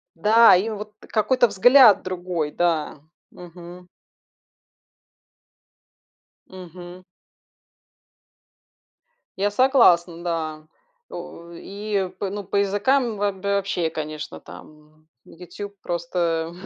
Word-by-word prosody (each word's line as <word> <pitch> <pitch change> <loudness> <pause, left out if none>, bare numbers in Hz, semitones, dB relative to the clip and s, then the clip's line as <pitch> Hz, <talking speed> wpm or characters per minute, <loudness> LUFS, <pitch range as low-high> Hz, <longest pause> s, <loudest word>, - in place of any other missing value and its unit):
Да, 220 +5 +6
и 195 +5 0
вот 210 0 -7
какой-то 235 +3 +1
взгляд 230 +2 +6
другой. 175 -4 -4
Да. 160 -4 -1 0.3
Мгм. 175 0 -13 2.6
Мгм. 180 0 -12 2.3
Я 205 +1 0
согласна, 180 -9 +3
да. 155 -2 -4 0.4
У 170 0 -10
и 200 +2 -4
по 200 - -3
ну, 205 +1 -6
по 200 +1 -3
языкам 215 +4 +1
вооб 200 -1 -3
вообще, 200 -4 -1
конечно, 155 -1 -7
там 155 +1 -16 0.2
"Ютуб" 180 +4 -10
просто 170 -1 -2
185 Hz, 85 wpm, -22 LUFS, 170-205 Hz, 2.6 s, Да